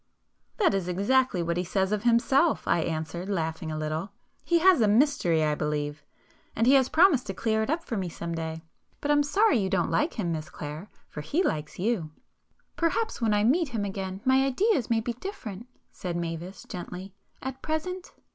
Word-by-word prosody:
"That 395 Hz, -, +3 dB
is 195 Hz, -3 st, -1 dB
exactly 200 Hz, +2 st, +2 dB
what 170 Hz, 0 st, -1 dB
he 180 Hz, -, 0 dB
says 190 Hz, +2 st, 0 dB
of 210 Hz, -1 st, 0 dB
himself,"—I 255 Hz, -, +3 dB
answered, 160 Hz, +3 st, -3 dB
laughing 160 Hz, -4 st, -2 dB
a 155 Hz, -, -3 dB
little—"He 160 Hz, -, -3 dB
has 350 Hz, -4 st, +5 dB
a 215 Hz, -, +4 dB
mystery 210 Hz, -, +3 dB
I 150 Hz, -1 st, +2 dB
believe,—and 150 Hz, +8 st, -4 dB
he 260 Hz, -, +6 dB
has 265 Hz, -2 st, +5 dB
promised 315 Hz, -6 st, +4 dB
to 195 Hz, -, -4 dB
clear 220 Hz, +2 st, 0 dB
it 220 Hz, -, -2 dB
up 330 Hz, +2 st, 0 dB
for 230 Hz, -, -4 dB
me 185 Hz, -3 st, -2 dB
some 170 Hz, 0 st, -5 dB
day. 160 Hz, 0 st, -4 dB, 0.4 s
But 295 Hz, -, 0 dB
I'm 290 Hz, 0 st, +5 dB
sorry 295 Hz, -, +3 dB
you 190 Hz, -2 st, 0 dB
don't 180 Hz, -2 st, 0 dB
like 300 Hz, +3 st, +1 dB
him, 180 Hz, -6 st, -1 dB
Miss 155 Hz, -1 st, -4 dB
Clare,—for 150 Hz, +1 st, -8 dB
he 315 Hz, -, 0 dB
likes 155 Hz, -, -2 dB
you." 190 Hz, -5 st, -1 dB, 0.7 s
"Perhaps 355 Hz, -, -1 dB
when 220 Hz, -2 st, +2 dB
I 205 Hz, -, +2 dB
meet 305 Hz, +9 st, +3 dB
him 220 Hz, -4 st, -2 dB
again 195 Hz, -1 st, -5 dB
my 260 Hz, +1 st, +4 dB
ideas 275 Hz, -, +1 dB
may 225 Hz, -1 st, +2 dB
be 240 Hz, +1 st, -3 dB
different"—said 230 Hz, -, -7 dB
Mavis 170 Hz, +2 st, -5 dB
gently—"at 195 Hz, +8 st, -8 dB
present 360 Hz, +4 st, -3 dB
205 Hz, 175 wpm, -27 LUFS, 170-265 Hz, 0.7 s, he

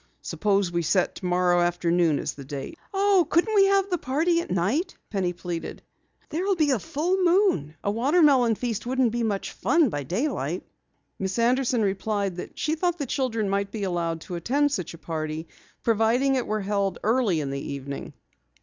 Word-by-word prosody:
"Suppose 200 Hz, -3 st, 0 dB
we 170 Hz, 0 st, 0 dB
set 175 Hz, +3 st, +1 dB
tomorrow 180 Hz, -1 st, +1 dB
afternoon 175 Hz, -2 st, +2 dB
as -, -, -3 dB
the 140 Hz, -, -10 dB
date." 140 Hz, -, -7 dB
"Oh, 390 Hz, -4 st, +3 dB
can't 340 Hz, +2 st, +4 dB
we 395 Hz, -2 st, +6 dB
have 395 Hz, 0 st, +3 dB
the 355 Hz, -, +1 dB
party 325 Hz, +7 st, +1 dB
at -, -, -8 dB
night?" 230 Hz, -, 0 dB
Penny 190 Hz, -4 st, 0 dB
pleaded. 175 Hz, -1 st, -6 dB, 0.5 s
"There 320 Hz, -, -2 dB
will 390 Hz, 0 st, +2 dB
be 305 Hz, -4 st, +2 dB
a 255 Hz, -, +2 dB
full 330 Hz, -, -1 dB
moon. 345 Hz, -, +2 dB
A 200 Hz, -, +1 dB
watermelon 260 Hz, -1 st, +4 dB
feast 235 Hz, 0 st, -3 dB
wouldn't 255 Hz, -2 st, +2 dB
be 240 Hz, +1 st, -2 dB
much 210 Hz, -4 st, -1 dB
fun 305 Hz, +1 st, +2 dB
by 145 Hz, -6 st, -3 dB
daylight." 200 Hz, -, -2 dB, 0.6 s
Miss 190 Hz, +2 st, -2 dB
Anderson 245 Hz, 0 st, +2 dB
replied 200 Hz, -1 st, -1 dB
that -, -, -8 dB
she 310 Hz, -, 0 dB
thought 350 Hz, +2 st, 0 dB
the 290 Hz, -, -3 dB
children 235 Hz, -5 st, -1 dB
might 200 Hz, 0 st, 0 dB
be 215 Hz, -2 st, -4 dB
allowed 170 Hz, -3 st, -1 dB
to 180 Hz, -, -8 dB
attend 275 Hz, -, +1 dB
such 180 Hz, -9 st, -3 dB
a -, -, -12 dB
party, 155 Hz, -1 st, -4 dB, 0.4 s
providing 230 Hz, +4 st, +2 dB
it 255 Hz, -2 st, 0 dB
were 215 Hz, 0 st, -1 dB
held 200 Hz, -1 st, -1 dB
early 220 Hz, -6 st, +2 dB
in 140 Hz, -2 st, -3 dB
the 140 Hz, 0 st, -3 dB
evening. 140 Hz, 0 st, -6 dB
215 Hz, 185 wpm, -25 LUFS, 175-290 Hz, 0.6 s, we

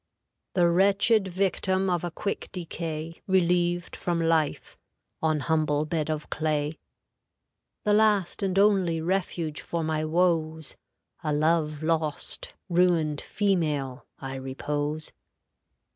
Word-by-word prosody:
"The 175 Hz, -2 st, +5 dB
wretched 195 Hz, +4 st, +4 dB
victim 190 Hz, +1 st, +1 dB
of 175 Hz, -2 st, 0 dB
a 175 Hz, -, -1 dB
quick 200 Hz, +4 st, -4 dB
decay, 165 Hz, -2 st, -5 dB
Relieved 175 Hz, -1 st, +2 dB
from 175 Hz, -1 st, -1 dB
life, 165 Hz, -2 st, 0 dB, 0.5 s
on 155 Hz, -2 st, +1 dB
humble 150 Hz, +1 st, +1 dB
bed 155 Hz, -1 st, -2 dB
of 155 Hz, -1 st, -2 dB
clay, 155 Hz, 0 st, -1 dB, 1.0 s
The 210 Hz, -, +3 dB
last 210 Hz, -4 st, +3 dB
and 195 Hz, -1 st, 0 dB
only 195 Hz, -5 st, +3 dB
refuge 170 Hz, -3 st, -2 dB
for 170 Hz, -1 st, -3 dB
my 155 Hz, 0 st, -1 dB
woes, 160 Hz, -2 st, 0 dB, 0.5 s
A 155 Hz, -, 0 dB
love 155 Hz, 0 st, +1 dB
lost, 155 Hz, -2 st, -2 dB
ruined 170 Hz, -4 st, +2 dB
female, 150 Hz, -10 st, -1 dB
I 135 Hz, -1 st, -6 dB
repose. 145 Hz, +3 st, -3 dB
165 Hz, 115 wpm, -27 LUFS, 155-180 Hz, 1.0 s, The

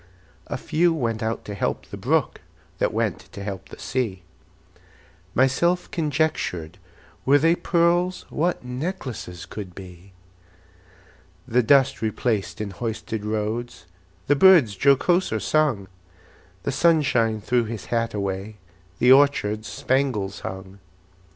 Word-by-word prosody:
A -, -, -3 dB
few 170 Hz, +2 st, +1 dB
went 115 Hz, -6 st, -2 dB
out 110 Hz, +1 st, -3 dB
to 105 Hz, -, -6 dB
help 100 Hz, -, -2 dB
the -, -, -9 dB
brook, -, -, 0 dB, 0.4 s
That -, -, +1 dB
went -, -, -1 dB
to 100 Hz, -, -7 dB
help 100 Hz, -2 st, -6 dB
the -, -, -11 dB
sea. 110 Hz, -8 st, -3 dB, 1.1 s
Myself 170 Hz, +8 st, +2 dB
conjectured, 145 Hz, -, -1 dB, 0.4 s
Were 140 Hz, +2 st, +5 dB
they 165 Hz, +3 st, +4 dB
pearls, 175 Hz, +1 st, +1 dB
What 170 Hz, -4 st, -1 dB
necklaces 125 Hz, -, -5 dB
could 95 Hz, -1 st, -8 dB
be! 95 Hz, 0 st, -12 dB, 1.3 s
The 125 Hz, 0 st, +3 dB
dust 135 Hz, +2 st, +3 dB
replaced 110 Hz, -1 st, -1 dB
in 105 Hz, -2 st, -4 dB
hoisted 110 Hz, 0 st, -4 dB
roads, 110 Hz, 0 st, -3 dB, 0.4 s
The 145 Hz, -, +3 dB
birds 150 Hz, -, +6 dB
jocoser 140 Hz, -, +3 dB
sung; 135 Hz, -9 st, +1 dB, 0.8 s
The -, -, -1 dB
sunshine 130 Hz, -8 st, +2 dB
threw 120 Hz, +3 st, +1 dB
his 110 Hz, -2 st, -6 dB
hat 115 Hz, -1 st, 0 dB
away, 100 Hz, +1 st, -3 dB, 0.4 s
The 125 Hz, +5 st, +5 dB
orchards 120 Hz, -6 st, +3 dB
spangles 105 Hz, -3 st, -1 dB
hung. 95 Hz, +1 st, -8 dB
115 Hz, 120 wpm, -24 LUFS, 105-145 Hz, 1.3 s, birds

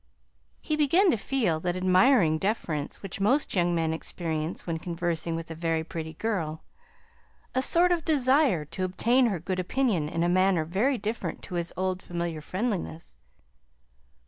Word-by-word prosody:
He 310 Hz, -, -1 dB
began 335 Hz, +6 st, +4 dB
to -, -, +2 dB
feel 215 Hz, -7 st, 0 dB
that 175 Hz, +2 st, -2 dB
admiring 185 Hz, -, +4 dB
deference 165 Hz, -8 st, -2 dB
which 195 Hz, 0 st, -6 dB
most 265 Hz, +9 st, +2 dB
young 175 Hz, -2 st, +2 dB
men 160 Hz, -1 st, 0 dB
experience 160 Hz, 0 st, -4 dB
when 165 Hz, -2 st, -3 dB
conversing 170 Hz, -1 st, -2 dB
with 165 Hz, 0 st, -6 dB
a -, -, -3 dB
very 165 Hz, 0 st, -1 dB
pretty 160 Hz, -1 st, -6 dB
girl: 165 Hz, -5 st, -3 dB, 0.9 s
a 260 Hz, -, +1 dB
sort 345 Hz, +6 st, +4 dB
of 340 Hz, -2 st, +1 dB
desire 270 Hz, -, +3 dB
to 185 Hz, +5 st, -4 dB
obtain 235 Hz, +7 st, +2 dB
her 195 Hz, -6 st, -1 dB
good 185 Hz, +3 st, -3 dB
opinion 185 Hz, -, 0 dB
in 165 Hz, +1 st, -1 dB
a -, -, +2 dB
manner 185 Hz, -2 st, +2 dB
very 215 Hz, -, +1 dB
different 220 Hz, +1 st, -4 dB
to 185 Hz, -, -8 dB
his 170 Hz, -1 st, -2 dB
old 185 Hz, 0 st, -1 dB
familiar 170 Hz, -3 st, -4 dB
friendliness. 180 Hz, -, -4 dB
180 Hz, 160 wpm, -27 LUFS, 165-235 Hz, 0.9 s, began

